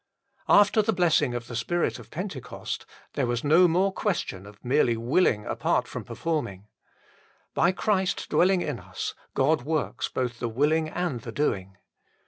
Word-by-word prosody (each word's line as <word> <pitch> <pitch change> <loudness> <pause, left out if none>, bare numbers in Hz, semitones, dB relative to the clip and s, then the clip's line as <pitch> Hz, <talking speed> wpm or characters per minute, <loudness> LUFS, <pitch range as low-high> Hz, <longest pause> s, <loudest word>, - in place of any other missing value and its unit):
After 205 +2 +6
the 220 +1 0
blessing 160 -8 +2
of 120 -1 -4
the 120 - -7
Spirit 170 +9 -1
of - - -13
Pentecost, 175 - -6 0.3
there 135 -3 0
was 120 -1 -1
no 165 +5 +6
more 185 +3 +2
question 130 - -2
of 100 +2 -15
merely 125 -3 +3
willing 115 - +2
apart - - 0
from - - -6
performing. 145 - -3 0.9
By 175 - +3
Christ 190 -1 0
dwelling 185 0 +3
in - - -3
us - - -5 0.2
God 140 +2 +3
works 155 +3 -2
both 125 -2 -3
the 120 - -2
willing 155 +6 +1
and 175 -7 -2
the 115 - -7
doing. 95 -8 -2
150 Hz, 155 wpm, -26 LUFS, 120-180 Hz, 0.9 s, After